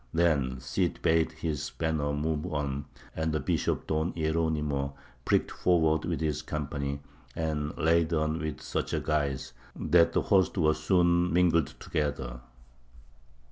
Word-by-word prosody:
Then 75 -7 +2
the 65 - -10
Cid - - -1
bade 80 0 +3
his 80 -2 -3
banner 80 -3 -1
move 75 +3 -2
on, 70 -1 -2 0.3
and 80 0 -1
the 75 - 0
Bishop 65 - -1
Don 80 +3 -1
Hieronymo 80 -4 -1 0.3
pricked - - +2
forward 80 -3 +2
with 85 -2 -2
his 75 -3 0
company, 70 -1 -3 0.3
and 75 -2 -2
laid 80 +1 +3
on 80 0 0
with 80 -3 -4
such - - -2
guise, 70 -4 -1 0.2
that 85 -1 +3
the - - +3
hosts 95 -1 +3
were 80 -3 +4
soon 85 +2 +2
mingled 85 -5 +3
together. 70 -5 -2
80 Hz, 140 wpm, -29 LUFS, 75-80 Hz, 0.3 s, were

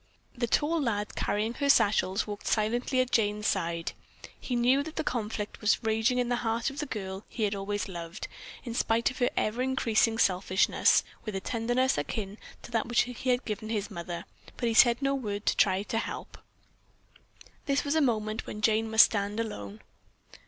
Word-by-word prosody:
The 240 -1 -1
tall 315 +7 +1
lad 210 -5 -1
carrying 215 +3 -1
her 280 +2 -1
satchels 205 -5 +3
walked 205 -1 -7
silently 240 +4 +1
at 255 0 -2
Jane's 210 -1 +1
side. 170 -3 -1 0.5
He 250 - -3
well 240 - +1
knew 255 +3 +4
the 315 +1 -4
conflict 215 -5 -3
that - - -15
was 215 +3 +2
raging 225 +3 +1
in 245 -1 +1
the 245 0 0
heart 230 +2 -1
of 275 - -8
the 295 - -3
girl 195 -4 -5
he 225 - -3
had 205 -1 +1
always 200 0 -3
loved, 170 -2 -6 0.4
in 235 - -5
spite 230 +1 +1
of 260 - -10
her 245 - +3
ever 220 +4 0
increasing 230 -3 +2
selfishness, 185 -2 +3 0.2
with 215 -3 -5
a - - 0
tenderness 245 - 0
akin 200 +7 -4 0.2
to - - -10
that 225 -1 0
which 240 0 +3
he 250 +1 -3
had 245 +1 +1
given 215 0 -4
his 210 -1 -2
mother, 170 -1 -6 0.3
but 240 - -1
he 230 - +1
said 235 +1 +6
no 275 0 +2
word 210 -6 -3
to - - +2
try 190 +2 +3
to 225 +1 -2
help. - - -6 1.3
This 275 -1 +1
was 285 - 0
a 320 - +3
moment 215 -4 0
when 210 - -6
Jane 220 +1 +2
must 220 0 +8
stand 205 0 -2
alone. 105 - -5
225 Hz, 195 wpm, -29 LUFS, 205-245 Hz, 1.3 s, must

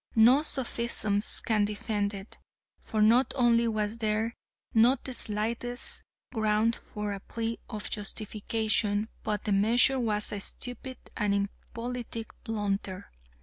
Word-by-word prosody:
No 240 +5 +7
sophisms 235 -7 0
can 215 -2 +3
defend 205 0 -1
it, 195 +2 -10 0.4
for 215 -1 0
not 235 +5 +4
only 235 -2 +4
was 215 0 -1
there 220 +1 0 0.4
not 240 +3 +5
the 260 - -5
slightest 235 +3 +1 0.3
ground 220 0 +2
for 210 -1 -5
a 200 - -5
plea 230 +3 -4
of 215 -3 -4
justification, 215 0 0
but 210 -1 -2
the 210 - -2
measure 235 +6 +4
was 210 -3 +1
a 205 - -3
stupid 245 +5 -5 0.2
and 205 -2 +1
impolitic 230 +3 -5
blunder. 200 -4 -3
220 Hz, 125 wpm, -29 LUFS, 210-235 Hz, 0.4 s, No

